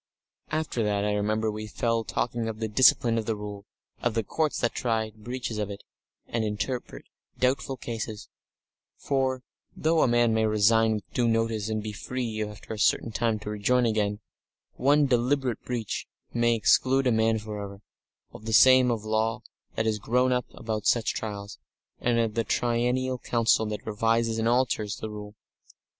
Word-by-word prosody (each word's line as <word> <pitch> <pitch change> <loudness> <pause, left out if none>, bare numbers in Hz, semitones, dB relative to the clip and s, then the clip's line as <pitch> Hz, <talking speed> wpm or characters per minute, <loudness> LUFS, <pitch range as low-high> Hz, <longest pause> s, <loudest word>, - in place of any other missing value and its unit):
Section - - -2
8 - - +2
After 135 -7 -2
that 100 -1 0
I 105 - +1
remember 110 +1 0
we 110 0 -6
fell 115 +1 0
talking 115 +1 -2
of 110 -1 -4
the 110 - -1
discipline 115 0 +4
of 110 - -5
the 110 - 0
Rule, 105 0 -8 0.3
of 120 -2 0
the 115 - +1
Courts 155 +7 -1
that 120 - +1
try 110 -2 -1
breaches 120 0 -5
of 105 -1 -2
it, 100 - -8 0.4
and 115 -1 -2
interpret 110 +4 -4 0.3
doubtful 130 +1 0
cases 110 -3 -5 0.7
for, 130 -2 -1 0.3
though 160 0 +2
a - - +4
man 120 -1 +3
may 110 0 +2
resign 110 +1 +3
with 105 - -8
due 120 -1 +2
notice 115 -2 0
and 110 -1 -2
be 110 - -4
free 115 0 -3
after 105 +1 -8
a 110 - -7
certain 115 - +2
time 115 0 0
to 105 - -5
rejoin 120 +4 +2
again, 105 -2 0 0.5
one 145 +3 +3
deliberate 125 -1 +1
breach 120 -4 -4 0.3
may 120 0 +3
exclude 130 +5 +3
a 125 - +3
man 110 0 +2
for 105 -1 -6
ever 100 0 -9 0.5
of 110 - -11
the 110 - -2
system 130 +2 +7
of 110 -3 -2
law 110 +2 0 0.3
that 110 - 0
has 110 -1 0
grown 125 +4 +2
up 125 -1 0
about 110 -2 -3
such 115 -2 +2
trials, 100 -1 -6 0.4
and 120 -1 +1
of 115 -2 +1
the 115 +1 0
triennial 125 +3 0
council 115 -2 +2
that 105 -1 -5
revises 115 +1 +1
and 110 - +1
alters 120 -4 +1
the 110 - -6
Rule. 105 0 -8
115 Hz, 180 wpm, -27 LUFS, 105-120 Hz, 0.7 s, system